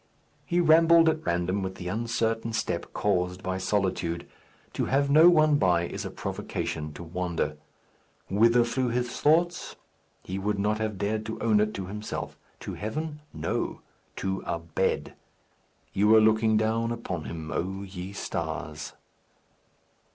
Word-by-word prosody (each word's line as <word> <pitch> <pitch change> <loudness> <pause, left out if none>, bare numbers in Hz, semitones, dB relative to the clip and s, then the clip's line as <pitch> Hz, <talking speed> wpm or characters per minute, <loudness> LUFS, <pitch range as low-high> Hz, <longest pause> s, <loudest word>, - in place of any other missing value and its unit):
He 175 0 +1
rambled 165 0 +6
at 160 0 -1
random 90 +3 0
with 95 0 -4
the 90 - -7
uncertain 115 +2 -1
step 90 -6 -2
caused 90 -2 0
by 95 0 -2
solitude. 95 -3 -1 0.5
To - - -1
have 140 +1 +1
no 160 +4 +8
one 155 -3 +4
by 90 -2 +3
is - - -5
a - - -3
provocative 75 -1 -4
to - - -7
wander. 85 -2 -2 0.7
Whither 115 +4 +4
flew 125 +2 -1
his 120 0 -2
thoughts? 170 +3 +2 0.5
He 95 +1 -4
would 105 +1 -1
not 105 +2 0
have 110 -2 -2
dared 105 +3 -1
to 110 - -5
own 110 -2 +3
it 105 0 +1
to 95 - -4
himself. 105 +3 -5 0.3
To - - -5
heaven? 150 +8 -4
No. - - -3 0.3
To 95 0 -2
a - - 0
bed. 85 -1 -1 0.8
You 100 +2 +3
were 110 +1 +8
looking 110 0 +4
down 110 +2 +1
upon 95 -9 -4
him, 80 -1 -6
O 95 +2 -2
ye 95 -1 -7
stars. 80 -5 -4
105 Hz, 150 wpm, -27 LUFS, 90-115 Hz, 0.8 s, no